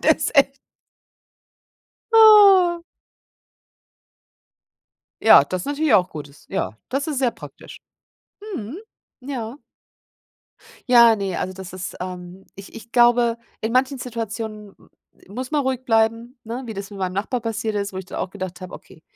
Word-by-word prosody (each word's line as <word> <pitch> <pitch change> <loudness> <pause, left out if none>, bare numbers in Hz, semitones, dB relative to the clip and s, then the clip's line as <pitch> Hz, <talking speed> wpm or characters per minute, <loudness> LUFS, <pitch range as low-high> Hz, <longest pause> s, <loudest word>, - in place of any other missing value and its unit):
Das - - +2
echt 275 0 +3 1.5
Oh. 400 -6 +7 2.4
Ja, - - +8
das 185 -1 -4
ist - - -8
natürlich 290 -2 0
auch 185 -3 +4
gut, 150 -2 -8
dass 140 - -20
ja 110 - -3
das 275 +3 -2
ist 290 -4 -2
sehr 250 -3 +1
praktisch. - - -13 0.8
Mhm. 240 - -6 0.4
Ja. 250 -2 -6 1.3
Ja, 235 -2 +7
ne, 195 -3 -3
also, 185 - -3
das 190 -1 -10
ist, 185 0 -7
ähm 180 +1 -8
ich 195 0 -12
ich 230 +1 -12
glaube, 240 -1 +3 0.2
in 220 - -2
manchen 260 +2 +1
Situationen 220 -3 -6
m - - -23 0.4
muss 250 +7 -6
man 295 - +1
ruhig 260 -1 -3
bleiben, 230 +2 0
ne, 235 +4 -6
wie 225 - -6
das 200 0 -7
mit 205 - -11
meinem 185 -1 -2
Nachbar 215 +6 -2
passiert 220 -1 -3
ist, 200 -1 -3
wo - - -6
ich 190 - -6
dann - - -8
auch 190 - -4
gedacht 185 -3 -7
habe: 185 -1 -9
„Okay, 160 - -14
225 Hz, 155 wpm, -21 LUFS, 195-260 Hz, 2.4 s, Ja